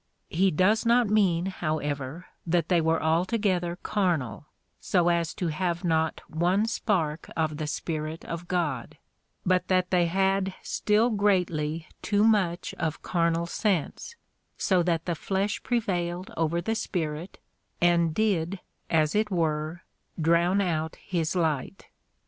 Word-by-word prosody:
He 190 +4 +3
does 185 +7 +3
not 235 -2 +3
mean, 185 -5 +3
however, 155 -3 -3 0.2
that 170 0 +1
they 175 -3 +4
were 160 0 +2
altogether 175 +1 +1
carnal, 155 - -1 0.3
so 175 -2 +2
as 170 -2 +1
to 175 - -1
have 175 +2 -2
not 160 -2 +1
one 180 +6 +1
spark 170 -9 -1
of 155 -2 0
the 155 -1 -3
Spirit 155 +1 -4
of 170 +1 -6
God 165 -10 -2 0.2
— - - -48
but 185 0 +2
that 185 -1 +1
they 175 -2 +3
had 190 +1 +1
still 220 +3 +2
greatly 175 -6 +1 0.2
too 205 -1 +2
much 190 -6 +2
of 160 -1 -2
carnal 170 -1 +1
sense, 195 - -1 0.4
so 185 -2 +2
that 165 -1 0
the 175 - 0
flesh 195 +5 -1
prevailed 185 -6 -1
over 165 +1 0
the 225 - -1
Spirit, 170 -5 -3 0.4
and 170 -2 +3
did 195 -3 0 0.3
as 155 -2 +2
it 210 0 +1
were 160 -2 -1 0.4
drown 170 +4 +3
out 160 -4 -1
his 170 -3 -2
light. 160 +1 -1
175 Hz, 135 wpm, -27 LUFS, 160-190 Hz, 0.4 s, they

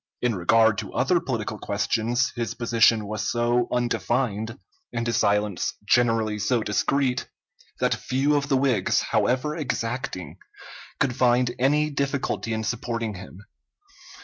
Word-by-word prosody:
In 125 -1 +1
regard 110 +3 +3
to 105 - -6
other 180 -2 +2
political 110 -7 -4
questions, 115 +4 0
his 115 -4 -3
position 115 -2 +3
was 110 +1 -3
so 120 0 +1
undefined, 120 -2 -1 0.3
and 115 -1 -2
his 120 - 0
silence 105 -2 +1
generally 115 -2 +2
so 110 +2 +1
discreet, 125 +5 0 0.5
that - - +2
few 135 +3 0
of 140 -1 -1
the 135 - +3
Whigs, 130 -8 +2
however 130 +5 0
exacting, 115 - -4 0.6
could 130 -4 +1
find 125 -1 +2
any 150 +4 +2
difficulty 140 -4 -2
in 110 0 -2
supporting 115 -1 -3
him. 95 +1 -11
120 Hz, 130 wpm, -25 LUFS, 110-130 Hz, 0.6 s, regard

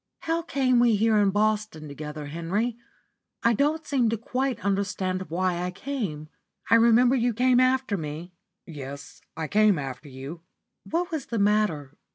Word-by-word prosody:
"How 330 +1 -1
came 265 -6 +1
we 240 -2 +4
here 215 +1 +3
in 200 -1 +4
Boston 210 -5 0
together, 150 +1 -7
Henry? 175 +10 -2 0.7
I 230 - +4
don't 300 +7 +1
seem 255 -5 +1
to 225 - -1
quite 250 0 -2
understand 190 -2 -1
why 175 +1 0
I 180 - -1
came. 185 - -4 0.4
I - - +8
remember 235 +3 +5
you 240 -2 +1
came 250 +1 +4
after 255 -4 +2
me?" 160 +3 -6 0.3
"Yes, 140 -3 -9 0.2
I 160 -1 -3
came 210 -1 +4
after 135 +1 -6
you." 135 +6 -8 0.5
"What 350 +2 -1
was 310 -5 -4
the 230 - -3
matter? 200 -9 +1
210 Hz, 160 wpm, -26 LUFS, 165-245 Hz, 0.7 s, I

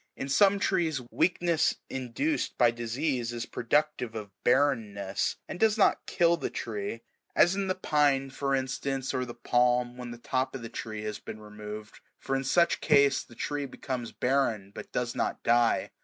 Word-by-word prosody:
In 135 - -5
some 200 +7 +5
trees 175 -7 +1
weakness 175 -2 +2
induced 130 - -2
by 120 -2 +5
disease 120 +1 -2
is 120 -1 -4
productive 125 -2 0
of 105 -2 -6
barrenness, 110 -8 +1
and 180 - -6
does 220 -1 +3
not 205 - +3
kill 170 0 +3
the - - -3
tree; 110 0 -4 0.3
as 175 - +5
in 195 -1 -1
the 185 - 0
pine" 145 -6 +2
for 135 0 0
instance, 135 0 -2
or 130 -1 -1
the 120 -1 -8
palm, 120 0 +2
when 125 -1 -6
the 120 - -7
top 130 +2 -1
of 130 - -6
the 115 - -6
tree 110 -1 -6
has 105 -1 -4
been 110 - -8
removed; 105 0 -9 0.2
for 135 - -2
in 135 - -1
such 170 +5 +3
case 140 -1 +4
the 120 - -16
tree 145 +2 -3
becomes 125 -2 -5
barren, 120 -7 0
but - - -9
does 120 -1 -1
not - - -2
die. 120 0 +3
130 Hz, 175 wpm, -29 LUFS, 115-145 Hz, 0.3 s, some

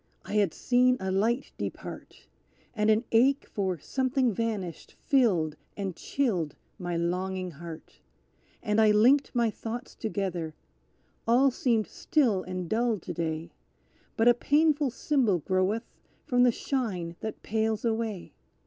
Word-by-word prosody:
I - - -6
had 205 -5 +3
seen 250 +5 +3
a 190 0 -2
light 225 +7 0
depart, - - -7 0.5
And 210 -2 +1
an 220 +2 +4
ache 260 +5 +4
for 190 -3 -2
something 260 - 0
vanished 200 -6 -4
filled 180 - +2 0.2
and 195 -4 -3
chilled 185 - -1 0.2
my 175 -2 -2
longing 185 +2 -2
heart, 165 +1 -10 0.6
And 215 -1 +2
I 215 - +6
linked 245 +7 +5
my 235 -2 +2
thoughts 230 +3 -6
together 185 -7 -3 0.7
"All 255 +4 +5
seemed 230 -4 +1
still 240 -11 +1
and 185 -1 -5
dull 230 +3 +1
to 175 - -7
day, 160 0 -3 0.7
But 225 0 +3
a 240 - +8
painful 295 +3 +2
symbol 250 - +1
groweth 185 - 0 0.4
from 245 -4 +2
the 250 -1 +6
shine 200 -11 -3
that 220 - -6
pales 220 0 -1
away! 220 -4 -2
220 Hz, 135 wpm, -28 LUFS, 185-245 Hz, 0.7 s, a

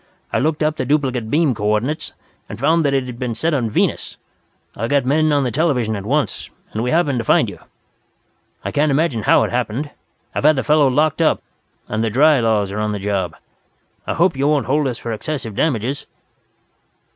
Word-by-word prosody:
I - - +2
looked 155 +1 0
up 155 0 0
the - - -2
duplicate 130 -6 0
beam 150 0 +2
coordinates, 110 +8 -1 0.4
and 105 - -7
found 160 +5 +3
that 140 -2 +1
it 135 - +1
had 125 -1 -8
been 125 -3 -3
set 160 +9 0
on 120 -6 0
Venus. - - -1 0.6
I 115 - -2
got 140 0 +1
men 155 +3 +2
on 145 -1 +2
the 125 - -1
television 125 -7 0
at 100 0 -6
once, 140 -5 -1 0.2
and 110 - -3
we 125 - -1
happened 145 -5 +1
to - - -2
find - - +3
you. - - -8 1.1
"I - - -2
can't 150 +1 +2
imagine 140 -5 +1
how - - +4
it - - -2
happened. 125 +4 -2 0.4
I've - - -2
had 155 +1 +5
the 130 - -1
fellow 150 -2 +4
locked 150 +3 +1
up, - - +2 0.4
and 110 +1 -2
the 115 - +1
'dry 145 +5 +4
laws' 110 -4 +1
are 105 - -4
on 105 0 -1
the - - -2
job. 100 -2 -2 0.7
I - - -1
hope 170 -1 +2
you 135 +2 0
won't 150 -2 +2
hold 145 +1 +1
us 120 -3 -3
for 115 - -5
excessive 115 0 -4
damages." 130 +1 -1
130 Hz, 205 wpm, -19 LUFS, 110-150 Hz, 1.1 s, had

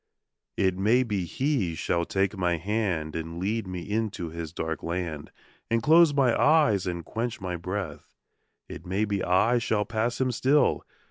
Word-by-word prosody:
It 95 -2 +2
may 115 +6 +4
be 105 -7 -2
he 120 - -1
shall 85 +1 -1
take 95 +2 0
my 90 -3 0
hand 90 -5 -2
And 80 +1 -5
lead 100 +3 -2
me 90 -2 -6
into 105 -6 -2
his 85 -2 -6
dark 80 -1 -4
land 85 -3 -4 0.4
And 115 0 +1
close 165 +2 +6
my 135 -4 +3
eyes 140 - +3
and 85 -2 -4
quench 115 0 -3
my 90 -3 -4
breath 90 -2 -6 0.5
It - - -9
may 95 +4 -1
be 100 -2 -2
I 110 +7 +3
shall 110 -3 0
pass 115 +3 -1
him 130 -1 +1
still. 135 +5 +2
100 Hz, 170 wpm, -27 LUFS, 85-115 Hz, 0.5 s, close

